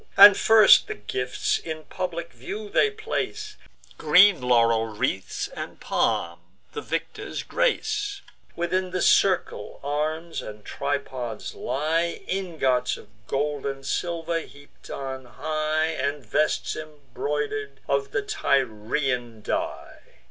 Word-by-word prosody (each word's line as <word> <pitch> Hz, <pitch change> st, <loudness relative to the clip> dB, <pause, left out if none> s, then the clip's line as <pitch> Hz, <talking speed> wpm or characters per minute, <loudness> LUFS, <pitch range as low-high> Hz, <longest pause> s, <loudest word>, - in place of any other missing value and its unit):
And 200 Hz, 0 st, +11 dB
first 220 Hz, -1 st, +7 dB
the -, -, -4 dB
gifts 125 Hz, +5 st, -1 dB
in 160 Hz, -1 st, -6 dB
public 170 Hz, -3 st, -5 dB
view 200 Hz, -, -7 dB
they 435 Hz, -, +4 dB
place, 430 Hz, 0 st, -4 dB, 0.4 s
Green 180 Hz, +3 st, +6 dB
laurel 115 Hz, -2 st, +3 dB
wreaths, 105 Hz, -3 st, -2 dB
and -, -, -7 dB
palm, 85 Hz, 0 st, 0 dB, 0.3 s
the 440 Hz, -, -4 dB
victors' -, -, -4 dB
grace: 420 Hz, -4 st, 0 dB, 0.3 s
Within 180 Hz, +2 st, -1 dB
the 185 Hz, 0 st, -2 dB
circle, 185 Hz, -, +2 dB
arms 155 Hz, +3 st, -2 dB
and 105 Hz, -1 st, -10 dB
tripods 130 Hz, -5 st, -4 dB
lie, 165 Hz, +4 st, -1 dB
Ingots 155 Hz, -10 st, 0 dB
of 105 Hz, -, -15 dB, 0.2 s
gold 145 Hz, 0 st, -1 dB
and 135 Hz, 0 st, -5 dB
silver, 170 Hz, +1 st, -1 dB
heap'd 145 Hz, -3 st, -14 dB
on 130 Hz, -1 st, -5 dB
high, 155 Hz, +4 st, -1 dB
And 140 Hz, 0 st, -2 dB
vests 150 Hz, +8 st, 0 dB
embroider'd, 145 Hz, -2 st, -4 dB
of 140 Hz, 0 st, 0 dB
the 405 Hz, -, -1 dB
Tyrian 125 Hz, -, -1 dB
dye. -, -, -3 dB
150 Hz, 115 wpm, -25 LUFS, 130-180 Hz, 0.4 s, And